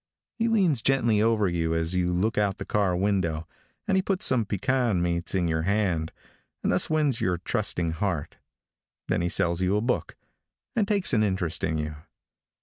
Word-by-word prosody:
He 230 - +2
leans 185 - +3
gently 115 -5 +2
over 110 -2 +2
you 80 -2 -1
as 80 +1 -1
you 90 -1 +1
look 100 +6 0
out 100 -2 +1
the - - -6
car 100 -4 +1
window, 90 -5 0 0.4
and 195 - +2
he 190 - +3
puts 190 -1 0
some 125 -4 +3
pecan 115 0 0
meats 85 +1 -1
in 90 -2 +1
your 80 -1 0
hand, 90 -4 0 0.5
and - - +1
thus - - +1
wins 150 -6 +1
your 90 -2 +1
trusting 90 -2 -1
heart. 85 -2 -3 0.7
Then - - +1
he 85 - 0
sells 85 0 +1
you 95 +2 +2
a - - +2
book, 125 +2 -1 0.6
and 215 -4 +1
takes 200 -7 +1
an 110 - +4
interest 95 -5 -1
in 80 -1 0
you. 75 0 -4
100 Hz, 185 wpm, -26 LUFS, 85-115 Hz, 0.7 s, an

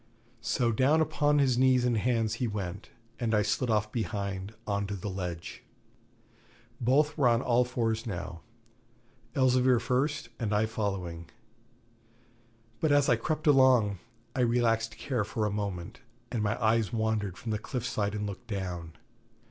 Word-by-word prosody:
So 115 +1 +1
down 135 +8 +3
upon 150 -2 +2
his 130 -4 +3
knees 130 -1 +4
and 120 -1 +2
hands 115 -1 +1
he 125 - +2
went, 100 -3 -5 0.3
and 115 -3 +1
I 105 - +3
slid 110 +4 0
off 105 -1 +1
behind, 100 -3 -3
on 100 -1 -1
to 100 - -3
the 100 +1 -5
ledge. 90 -3 -5 1.2
Both 145 +6 +2
were 135 - +5
on 120 0 +3
all 125 0 +3
fours 115 -2 -1
now; 90 -3 -5 0.9
Elzevir 130 -2 +4
first 135 +5 -1
and 110 -3 0
I 105 +1 +3
following. 95 -7 -4 1.5
But 155 - +1
as 145 -1 +4
I 120 - +5
crept 155 +7 -3
along, 130 - +5 0.4
I - - -2
relaxed 115 -2 +1
care 125 -6 -1
for 110 +1 -2
a 105 - 0
moment, 100 +1 -4 0.3
and 115 - -1
my 100 -1 0
eyes 110 -1 +2
wandered 110 -5 -1
from 115 - -5
the 105 - -1
cliff 125 +2 -4
side 105 -3 -1
and 105 0 -2
looked 100 -2 -7
down. 90 -6 -4
110 Hz, 155 wpm, -29 LUFS, 100-125 Hz, 1.5 s, were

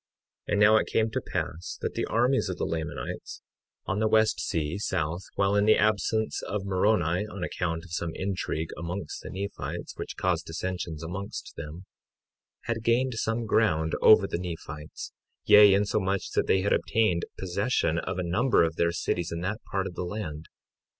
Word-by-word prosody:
53:8 - - -2
And 105 - +2
now 110 +1 +7
it - - +1
came 110 0 +1
to - - -1
pass 85 +3 -4
that - - -2
the - - -1
armies 125 -1 +2
of 90 - -3
the - - -1
Lamanites, 80 -1 -5 0.4
on 95 - -1
the 110 - +2
west 110 0 +3
sea, 80 +3 -2
south, 80 -3 -1
while 100 +1 +2
in 105 0 +3
the 110 - +6
absence 110 +1 +1
of 100 -1 -3
Moroni 95 -1 +2
on 100 -3 -6
account 80 -1 -2
of 85 - -14
some 85 0 -2
intrigue 90 -4 -2
amongst 85 -1 -5
the - - -8
Nephites, 100 +2 -5
which - - -6
caused 90 -2 0
dissensions 85 -1 -4
amongst 95 +5 -6
them, 80 +5 -8 0.8
had 115 -1 -3
gained 120 +3 +2
some 115 +1 -1
ground 80 -8 +2
over 110 -2 +7
the 85 - -3
Nephites, 80 -3 -7 0.3
yea, 105 -1 +9
insomuch 100 -1 +1
that - - +1
they 95 - +3
had 100 - +2
obtained 100 -6 +1
possession 95 -3 0
of - - -4
a 90 - -1
number 105 +7 +3
of 80 -1 -1
their 85 0 +2
cities 85 0 -2
in 85 0 -3
that 105 +5 -3
part 95 0 -1
of 95 - -5
the - - -5
land. 85 -5 -5
95 Hz, 180 wpm, -28 LUFS, 85-105 Hz, 0.8 s, yea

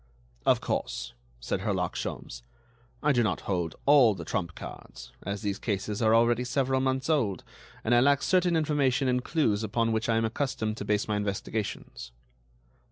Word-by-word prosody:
"Of - - +4
course," - - -3 0.3
said 60 - -2
Herlock - - -1
Sholmes, - - -5 0.6
"I 150 - +4
do 120 -4 +3
not 110 - 0
hold 90 -4 -2
all 135 -7 +6
the - - -7
trump 85 -5 -3
cards, - - -10
as 100 0 -4
these 100 -1 -2
cases 105 0 -2
are 110 0 +4
already 120 +1 +3
several 130 +1 0
months 130 0 0
old, 130 - +1 0.4
and 120 - +1
I 120 - +6
lack 140 +2 +3
certain 180 -2 +3
information 145 -4 +1
and 125 0 +1
clues 120 -11 +1
upon 115 +2 0
which 110 +1 -1
I 115 - +3
am 115 - +2
accustomed 110 -2 -2
to 100 - -5
base 105 0 0
my 105 -1 0
investigations." 100 - -4
115 Hz, 170 wpm, -28 LUFS, 105-130 Hz, 0.6 s, all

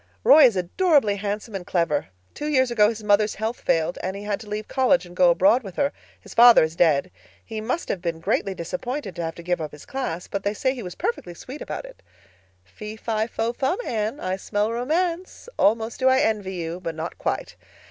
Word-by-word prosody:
Roy 380 - +8
is 235 -5 +4
adorably 220 - +2
handsome 205 +2 -4
and 195 -2 -4
clever. 170 -3 0 0.3
Two 295 - -5
years 260 -4 +2
ago 210 -3 +4
his 220 -1 -6
mother's 210 0 +3
health 220 +3 -3
failed 165 +1 0
and 190 +1 -3
he 200 - -7
had 205 -1 -2
to 215 - -11
leave 210 +1 -4
college 260 -4 +2
and 175 0 -13
go 180 -1 +5
abroad 195 +8 +4
with 195 -6 -10
her—his 280 0 -5
father 240 -4 +8
is 160 +1 -2
dead. 170 +1 +2 0.3
He 220 -2 -5
must 250 +10 -2
have 180 - -3
been 170 -2 -3
greatly 190 +3 -1
disappointed 195 - -5
to - - -4
have 165 -1 -4
to 170 - -10
give 175 -1 -1
up 155 -2 -4
his 150 - -12
class, 250 -11 -4
but 200 - -3
they 205 +1 -1
say 260 +4 0
he 255 - -7
was 180 -4 -7
perfectly 175 -7 -3
sweet 265 - -9
about - - -5
it. - - -14 0.6
Fee—fi—fo—fum, 220 - -2
Anne. 220 +4 -2
I 185 +1 -2
smell 205 +2 -1
romance. 335 - -2
Almost 225 +2 +2
do 260 0 +4
I 260 - +4
envy 205 -6 0
you, 170 0 -4
but 165 -3 -5
not 160 +2 -6
quite. - - -3
210 Hz, 210 wpm, -24 LUFS, 180-245 Hz, 0.6 s, Roy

